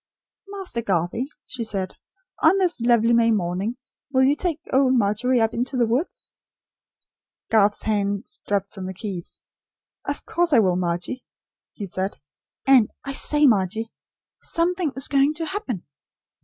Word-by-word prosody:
"Master 390 -12 -3
Garthie," 195 +4 -1 0.2
she 245 -2 -5
said, 195 -4 -3 0.5
"on 325 +5 +5
this 360 -9 +1
lovely 235 -1 +4
May 230 0 +4
morning, 200 +3 -1 0.3
will 260 -1 +4
you 275 +2 +4
take 330 -1 -1
old 260 -1 +4
Margery 235 +3 +2
up 225 0 +2
into 250 +3 -2
the 240 - +4
woods?" 245 +10 -2 1.2
Garth's 210 -2 +3
hands 205 -2 -1
dropped 200 -1 -1
from 190 -2 -6
the 190 - -6
keys. 185 -3 -7 0.6
"Of - - -4
course 345 -2 +1
I - - +7
will, 185 -4 +3
Margie," 180 +8 -2 0.5
he 205 - -6
said. 190 +1 -3 0.5
"And, 260 -5 +6
I 275 - -4
say 295 +2 +3
Margie, 220 -1 +2 0.5
SOMETHING 340 -3 0
IS 270 - -1
GOING 280 +2 +3
TO 325 +1 -3
HAPPEN." 305 - -4
235 Hz, 145 wpm, -23 LUFS, 200-275 Hz, 1.2 s, I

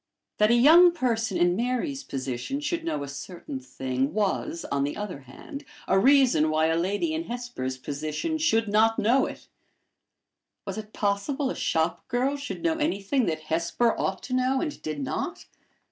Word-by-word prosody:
That 210 0 +5
a 235 - +5
young 330 +8 +7
person 230 - 0
in 175 0 +3
Mary's 255 - -1
position 135 - -4
should 325 +3 -2
know 325 - -2
a - - -6
certain 140 -1 -7
thing, 130 +2 -3
was, 195 -5 -1
on 140 -1 +1
the 145 - -2
other 205 -8 -5
hand, 145 - -10 0.2
a 190 - +4
reason 250 - +5
why 155 0 +2
a 160 - +2
lady 200 - 0
in 325 +1 -2
Hesper's 240 - -4
position 155 - -3
should 225 -8 +2
not 220 +2 +3
know 245 +6 +3
it! - - -10 1.2
Was - - -4
it 215 0 -9
possible 260 +8 -1
a - - -5
shop 160 +1 -1
girl 255 +4 0
should 285 +3 -6
know 325 -1 +1
anything 255 - 0
that 160 -2 -1
Hesper 170 +9 0
ought - - -2
to 255 - -5
know 255 +1 +2
and 300 0 -4
did 150 -2 -4
not? - - -4
215 Hz, 175 wpm, -26 LUFS, -, 1.2 s, young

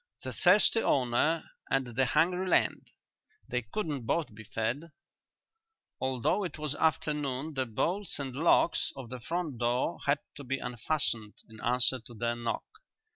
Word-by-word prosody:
"The - - -4
thirsty 205 +4 +5
owner 135 - +1 0.2
and 135 -1 +2
the 130 +1 +3
hungry 180 +8 +2
land: - - +2 0.6
they 125 - -1
couldn't 135 - -4
both 160 -6 0
be 110 +1 -10
fed." 120 +10 -2 1.1
Although 130 - +1
it 180 - -4
was 150 -2 -2
afternoon 150 -2 0
the 130 -2 -1
bolts 180 - 0
and 135 -3 -4
locks 165 +2 +3
of 130 -4 -8
the 130 - -5
front 160 -1 -3
door 120 +6 0
had 140 +1 +4 0.2
to 145 - -7
be 135 +1 -1
unfastened 120 -3 -1
in 110 0 -13
answer 125 +2 +3
to 120 +1 -13
their 120 +1 -1
knock. 120 -1 -3
135 Hz, 150 wpm, -30 LUFS, 120-160 Hz, 1.1 s, thirsty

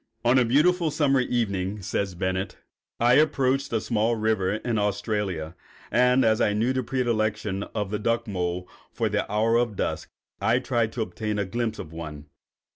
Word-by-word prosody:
] 115 +1 -31
"On 125 +2 +5
a 125 - +3
beautiful 165 +7 +3
summer 145 -3 +2
evening," 105 -5 -1
says 95 -2 -2
Bennett, 95 +1 -2 0.4
"I 120 +1 +4
approached 135 -3 +1
a 115 - +1
small 115 +1 +1
river 110 -3 +1
in 110 +1 -1
Australia, 100 -5 -2 0.4
and 125 +2 +4
as 110 -1 +3
I 105 - +3
knew 115 +5 +1
the 130 - 0
predilection 110 -5 -1
of 105 -2 -2
the 105 - -1
duck 115 +2 0
mole 90 -2 -2 0.2
for - - -1
the - - -1
hour 110 +2 +3
of 120 -3 0
dusk, - - -3 0.3
I 115 +2 +3
tried 120 -3 0
to 115 - -1
obtain 105 -1 -4
a 100 - 0
glimpse 110 +3 -2
of 80 - -8
one. 75 -3 -7
110 Hz, 180 wpm, -26 LUFS, 100-120 Hz, 0.4 s, On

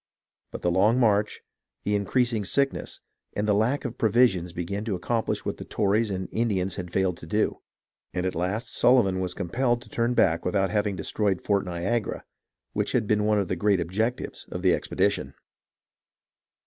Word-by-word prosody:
But - - -7
the 90 - +2
long 105 +7 +3
march, 105 -3 +2 0.4
the 105 - 0
increasing 110 +2 +1
sickness, 140 +7 -1 0.3
and 105 +1 -1
the 105 - +4
lack 120 +8 +1
of 120 -1 -5
provisions 105 -6 +3
be 85 0 -4
gan 100 +4 -3
to 105 -4 -1
accomplish 115 +5 -1
what - - -2
the - - -7
Tories 105 +2 +1
and 95 -1 -3
Indians 95 -5 0
had 90 -2 -6
failed 95 -2 +1
to 80 - -11
do; 105 +6 0 0.5
and 90 0 -2
at 95 - 0
last 90 +7 -2
Sullivan 115 -7 +4
was 90 -1 -2
compelled 120 +6 0
to 115 - -17
turn 120 +2 0
back 85 -6 +3
without 95 +1 +1
having 105 -2 0
destroyed 95 +2 -1
Fort 100 -1 0
Niagara, 95 +6 -2 0.5
which - - -1
had 120 -3 +2
been 105 0 +1
one 105 0 +3
of 100 -2 0
the - - -1
great 100 +2 +2
objects 110 +9 -2
of 90 - -5
his 95 - +5
expedition. - - -1
100 Hz, 180 wpm, -26 LUFS, 90-115 Hz, 0.5 s, his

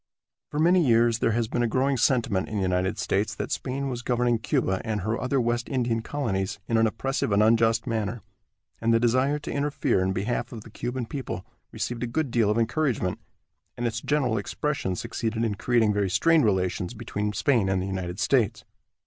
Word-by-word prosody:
For 150 - -5
many 175 +2 +5
years 115 -3 +3
there 115 - +2
has 115 0 0
been 120 - -1
a 120 - +2
growing 135 +4 +1
sentiment 120 -6 +1
in 110 - -5
the 100 - 0
United 90 0 0
States 100 +3 0
that - - -4
Spain 135 +2 -2
was 125 -2 -4
governing 120 -1 +1
Cuba 95 -3 0
and 110 -3 -2
her 110 +4 -2
other 130 +2 +1
West 120 0 -1
Indian 120 -4 0
colonies 105 -7 -2
in 115 - +1
an 115 0 +4
oppressive 130 +1 -2
and 100 +1 +4
unjust 115 0 +3
manner, 110 0 -2 0.6
and 115 +1 +1
the 115 - +4
desire 130 +5 +2
to 150 - -6
interfere 140 -8 0
in 95 0 +1
behalf 100 +6 -2
of 115 -3 -7
the 110 - -13
Cuban 120 +2 -4
people 135 +3 -5 0.3
received 120 -1 -4
a 120 - -1
good 140 +2 -1
deal 115 -3 +2
of 105 - +1
encouragement, 115 - 0 0.6
and 120 - -2
its 115 0 -2
general 130 -7 +1
expression 120 -3 -2
succeeded 115 +4 -2
in 110 -3 0
creating 110 0 +2
very 100 -2 0
strained 165 - +4
relations 95 +1 0
between 105 -2 -3
Spain 115 -3 +2
and 95 -1 +1
the 95 - -2
United 95 -1 -4
States. 110 -1 +1
115 Hz, 200 wpm, -26 LUFS, 105-125 Hz, 0.6 s, many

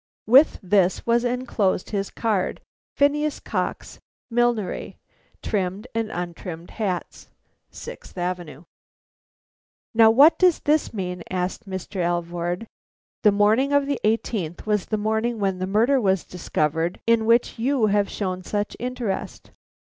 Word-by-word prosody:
With 265 +7 +6
this 185 -1 +2
was 235 0 +2
enclosed 245 -7 -1
his 200 -2 -2
card: 215 -5 -1 0.4
PHINEAS 295 +1 +2
COX, - - -4 0.3
Millinery, 240 -4 0 0.5
Trimmed 195 +1 -2
and 225 -1 -1
Untrimmed 175 -2 -6
Hats, 195 -5 -4 0.4
Sixth - - -10
Avenue. 175 -4 -4 1.3
"Now, 225 -1 +7
what 280 +9 +6
does 360 -3 +4
this 300 +1 +1
mean?" 180 -4 -4
asked 185 +3 -3
Mr. 190 +2 -6
Alvord. 175 +2 -2 0.6
"The 210 - +5
morning 215 +7 +3
of 285 -1 +3
the 280 -2 -2
eighteenth 210 -6 -1
was 210 -3 0
the 215 - -1
morning 220 +3 0
when 195 -3 -1
the 185 - -2
murder 235 +7 +3
was 190 -4 +2
discovered 165 -1 -2
in 230 -1 +3
which 235 0 +2
you 255 -1 +2
have 205 -1 +2
shown 185 -2 -3
such 205 +2 -3
interest." 245 -5 -4
210 Hz, 130 wpm, -23 LUFS, 185-235 Hz, 1.3 s, Now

